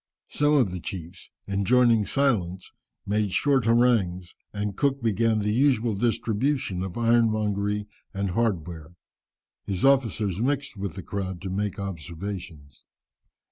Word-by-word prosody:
Some 145 0 +2
of 125 -10 +3
the 90 - -4
chiefs, 90 0 -7 0.2
enjoining 110 +2 +3
silence, 95 -10 0 0.3
made 105 0 0
short 135 +4 +2
harangues, 110 -7 +2 0.2
and 105 -1 -3
Cook 140 0 0
began 115 0 +2
the 105 0 0
usual 120 -3 +2
distribution 115 -1 0
of 95 +1 -5
ironmongery 110 -3 +1 0.3
and 100 -1 -2
hardware. 85 -7 -2 0.7
His 95 +1 -1
officers 110 -8 +2
mixed 135 0 -1
with 100 -4 -5
the 95 - -7
crowd 95 -3 -4
to 95 - -4
make 100 +1 -2
observations. 85 -5 -7
105 Hz, 125 wpm, -26 LUFS, 95-120 Hz, 0.7 s, of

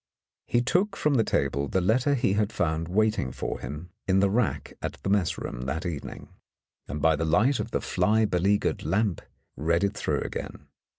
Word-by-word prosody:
He 120 - +2
took 195 +9 +1
from 150 -5 +1
the 115 -5 +4
table 70 -5 0
the 95 - +1
letter 125 +10 +2
he 120 -6 +1
had 105 +1 +1
found 80 -2 -1
waiting 105 - +1
for - - -4
him 80 +5 -7 0.2
in 95 0 +4
the 100 0 +3
rack 115 0 0
at - - -3
the 95 - 0
mess 100 -5 +1
room - - -5
that 80 +6 -2
evening, 80 -5 -6 0.6
and 75 - -4
by 80 0 +5
the 80 - -2
light 105 - +3
of - - -3
the - - -1
fly 110 +1 +2
beleaguered 100 +1 +1
lamp 100 -3 0 0.3
read 85 +6 +1
it 100 +1 +1
through - - -1
again. - - -6
95 Hz, 190 wpm, -27 LUFS, 80-110 Hz, 0.6 s, by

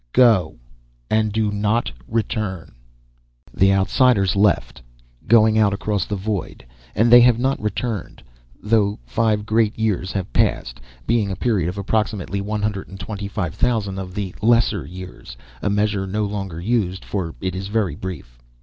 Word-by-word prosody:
"Go, 115 - +4 0.5
and 110 -1 +2
do 110 0 0
not 105 +3 0 0.2
return." 105 -6 -3 0.8
The 95 +1 +4
Outsiders 95 0 +3
left, 100 -9 +1 0.5
going 110 -1 +5
out 100 -2 +3
across 100 -1 -1
the 105 - -3
void, 100 - -4 0.3
and 115 +2 +3
they 120 - +10
have 120 -1 +5
not 135 +3 0
returned, 105 -1 -4 0.4
though 105 -2 +1
five 105 - 0
Great 110 0 +1
Years 105 -5 -1
have 95 -11 -4
passed, 60 -1 0 0.2
being 115 -3 +1
a 95 - -3
period 95 -5 0
of 90 - -6
approximately 100 -1 -1
one 105 +1 -3
hundred 105 -2 -2
and 95 - -11
twenty 100 +1 -5
five 95 -6 -3
thousand 100 -6 0
of 90 -1 -7
the 100 -3 -3
lesser 115 - +2
years 65 -9 -10 0.2
a - - 0
measure 100 -1 0
no 105 +3 -1
longer 100 -5 -5
used, 95 -2 -1
for 90 -5 -3
it 95 -2 -3
is 95 +1 -4
very 105 -5 0
brief. 75 -10 -8
100 Hz, 160 wpm, -21 LUFS, 95-110 Hz, 0.8 s, they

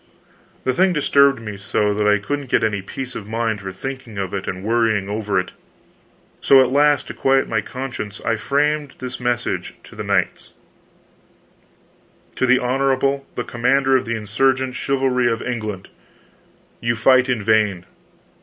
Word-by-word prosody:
The 130 - +1
thing 185 +6 +3
disturbed 140 -3 +3
me 105 -3 -7
so 105 +1 0
that 105 0 0
I 105 0 +5
couldn't 140 +6 -4
get - - +2
any 105 -3 0
peace 125 +6 -7
of 100 - -7
mind 110 -2 -2
for 95 -1 -6
thinking 125 +2 -7
of 95 -2 -3
it 100 -1 -4
and 95 0 -4
worrying 110 -3 +1
over 105 -2 -1
it. 90 - -4 0.9
So, 135 - +6
at 130 -1 +3
last, 145 +1 +3
to - - -5
quiet 135 0 +2
my 110 -1 0
conscience, 120 -4 -6
I 115 - +2
framed 145 +4 0
this 130 0 -6
message 120 -1 -2
to - - -14
the - - -5
knights: - - -1 1.8
TO 130 - +1
THE 130 0 +5
HONORABLE 135 +2 0
THE 120 - -2
COMMANDER 130 +3 +2
OF 130 - +1
THE 115 - -1
INSURGENT 130 +5 0
CHIVALRY 130 -2 0
OF 115 - -3
ENGLAND: 110 -6 -4 0.9
You 115 0 0
fight 130 +3 +4
in 120 -5 0
vain. 105 -4 +2
120 Hz, 165 wpm, -20 LUFS, 105-135 Hz, 1.8 s, So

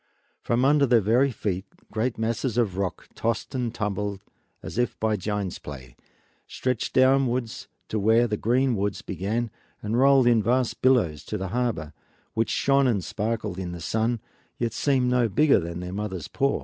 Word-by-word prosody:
From 120 +2 +1
under 145 0 +4
their 120 -1 +5
very 120 +7 +3
feet 100 -5 -3 0.2
great 115 +3 -1
masses 115 +2 -1
of 110 -7 +1
rock, 95 -3 -3
tossed 115 0 -2
and 125 -3 -1
tumbled 105 -3 -3 0.4
as - - -5 0.2
by 110 0 +1
a - - 0
giant's 100 -1 -3
play, 65 -4 -10 0.5
stretched 125 -3 -2
downwards 130 -3 +2 0.2
to 110 - -1
where 110 +4 +4
the 105 -3 -1
green 125 +4 +1
woods 100 -1 -2
began 110 +4 -2 0.3
and 110 +3 -1
rolled 135 -1 +6
in 120 -2 +5
vast 125 +3 0
billows 90 - +3
to 105 - -3
the 95 -1 -4
harbor, 110 -9 -2 0.4
which 115 0 0
shone 135 -1 +3
and 105 -7 +1
sparkled 105 +1 -3
in 90 -2 -4
the 85 - -7
sun, 115 +6 0 0.4
yet 115 -2 -1
seemed 130 0 +1
no 125 -2 +3
bigger 145 +7 +4
than 85 0 -5
their 90 0 -6
mother's 95 -5 -4
paw. 140 +9 0
115 Hz, 175 wpm, -25 LUFS, 100-125 Hz, 0.5 s, rolled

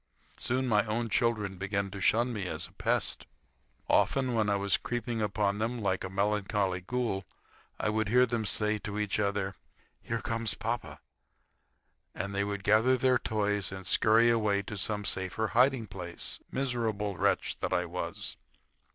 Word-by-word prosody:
Soon 130 +1 0
my 105 -3 +4
own 115 +2 -1
children 105 -3 0
began 100 0 -1
to 100 0 -7
shun 120 +4 +3
me 100 -4 -3
as 80 +1 -2
a - - -13
pest. - - -1 0.6
Often, 130 -2 +2
when 110 -2 +2
I 100 - +3
was 100 -1 +2
creeping 120 -1 -3
upon 105 -1 0
them 115 +2 -1
like 95 -3 0
a 95 - -4
melancholy 100 -1 0
ghoul, 110 -1 -2 0.6
I - - +1
would 110 -1 0
hear 125 +3 +6
them 115 -3 -1
say 105 0 +1
to 105 0 -5
each 105 -1 -1
other: 100 -1 0 0.5
"Here 115 - -2
comes 115 -1 -2
papa," 115 +1 -4 1.1
and 100 0 -3
they 100 0 +1
would 100 -1 -3
gather 110 +5 +4
their 125 0 +3
toys 105 -2 -1
and 95 -1 -7
scurry 110 +5 +5
away 105 -3 +2
to 105 +1 -6
some 105 +1 -1
safer 95 +3 -1
hiding 125 +3 +3
place. 90 -4 -5
Miserable 115 -6 -1
wretch - - +1
that - - -2
I - - +1
was! - - -4
105 Hz, 165 wpm, -30 LUFS, 100-115 Hz, 1.1 s, hear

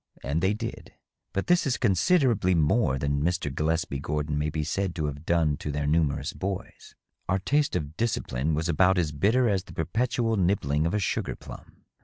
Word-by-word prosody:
And 70 +5 -1
they 95 +3 +2
did; - - -7 0.4
but 95 - -2
this 175 -4 +3
is 130 - +1
considerably 115 - +3
more 80 - +2
than 70 +1 -1
Mr. 85 -3 -1
Gillespie 80 -1 -1
Gordon 75 +1 -2
may 75 +1 0
be 75 0 -2
said 95 +3 -2
to 80 - -1
have 75 +2 -5
done 80 -4 +2
to 75 - -4
their 75 0 -2
numerous 75 -2 +1
boys. 95 -1 -6 0.3
Our 95 - +3
taste 145 +9 +1
of 75 +1 -3
discipline 80 - -1
was 80 +2 -1
about 90 +3 +3
as 80 -4 +1
bitter 110 - +2
as 95 -4 +1
the - - -12
perpetual 115 +6 0
nibbling 85 -5 +1
of 85 - -1
a - - +2
sugar 100 - -1
plum. - - -13
85 Hz, 190 wpm, -27 LUFS, 75-100 Hz, 0.4 s, this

